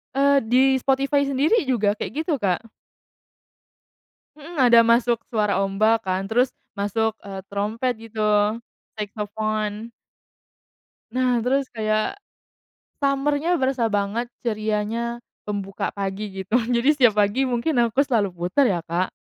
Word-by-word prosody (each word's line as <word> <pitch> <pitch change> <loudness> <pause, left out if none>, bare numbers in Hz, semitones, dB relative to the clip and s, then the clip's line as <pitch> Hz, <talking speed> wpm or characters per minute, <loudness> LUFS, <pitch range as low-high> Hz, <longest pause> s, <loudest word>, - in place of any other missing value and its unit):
Eee, 280 0 +4
di 250 +3 +4 0.2
Spotify 275 +2 +1
sendiri 285 - +2
juga 215 -6 +2
kayak 210 - -5
gitu, 305 -6 -1
Kak. 200 +3 -1 1.7
Mhm, 310 +2 -8
ada 235 -1 +7
masuk 235 0 +2
suara 210 -3 +1
ombak 215 +3 +2
kan, 190 +1 -2
terus 245 +4 +2 0.2
masuk, 215 +2 -1
eee, 195 -1 -7
terompet 215 +5 -1
gitu 225 -1 -9 0.8
saxophone. 215 +1 -3 1.3
Nah, 255 -1 +2
terus 270 +1 +1
kayak 215 - -1 0.8
summer-nya 285 +4 +1
berasa 260 -5 0
banget 205 +3 -1 0.2
cerianya 220 +2 -2 0.3
membuka 195 -1 -3
pagi 200 +1 -3 0.2
gitu 230 +6 +2
jadi 245 +2 +1
setiap 250 -7 +4
pagi 255 +7 0
mungkin 245 +6 0 0.2
aku 270 +5 +2
selalu 225 -7 +1
puter 180 +11 +2
ya, 170 - -3
Kak. 175 +2 -1
230 Hz, 120 wpm, -23 LUFS, 205-265 Hz, 1.7 s, ada